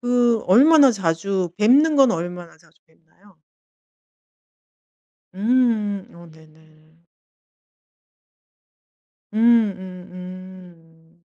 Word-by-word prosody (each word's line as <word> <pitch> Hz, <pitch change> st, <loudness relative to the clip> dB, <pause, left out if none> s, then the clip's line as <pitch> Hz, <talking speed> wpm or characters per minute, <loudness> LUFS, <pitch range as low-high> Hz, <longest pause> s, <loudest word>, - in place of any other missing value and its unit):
그 245 Hz, -2 st, 0 dB
얼마나 275 Hz, -, +5 dB
자주 185 Hz, -1 st, -3 dB
뵙는 285 Hz, +8 st, +3 dB
건 270 Hz, -3 st, +4 dB
얼마나 175 Hz, 0 st, -7 dB
자주 160 Hz, -1 st, -29 dB
뵙나요? 165 Hz, +3 st, -28 dB, 2.0 s
음음 215 Hz, -3 st, -1 dB
어 170 Hz, -1 st, -15 dB
네네. 155 Hz, +1 st, -24 dB, 2.3 s
음 215 Hz, -, -7 dB, 0.4 s
음 185 Hz, -1 st, -12 dB
음. 180 Hz, -3 st, -14 dB
185 Hz, 130 characters per minute, -20 LUFS, 165-220 Hz, 2.3 s, 얼마나